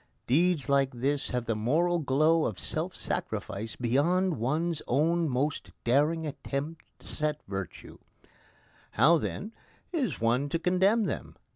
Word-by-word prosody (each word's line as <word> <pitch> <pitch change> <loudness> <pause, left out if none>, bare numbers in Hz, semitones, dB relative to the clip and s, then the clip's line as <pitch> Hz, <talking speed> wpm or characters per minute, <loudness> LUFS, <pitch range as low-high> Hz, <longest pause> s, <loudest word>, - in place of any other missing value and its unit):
Deeds 160 +3 +2
like 140 -1 +3
this 135 +4 0
have 125 -1 -2
the 115 -1 0
moral 165 +11 +1
glow 155 +3 +3
of 105 - -2
self - - -3
sacrifice 110 +3 -4
beyond 155 +7 +1
one's 155 +7 0
own 160 +5 +2
most 140 +4 -1
daring 150 +7 +2
attempts 150 +2 -6
at 150 0 0
virtue. 95 -1 -6 0.9
How, 165 +1 +5
then, 210 +7 -4 0.4
is 265 - -1
one 120 +5 +1
to 165 - 0
condemn 190 +6 +3
them? - - -4
150 Hz, 130 wpm, -29 LUFS, 125-170 Hz, 0.9 s, How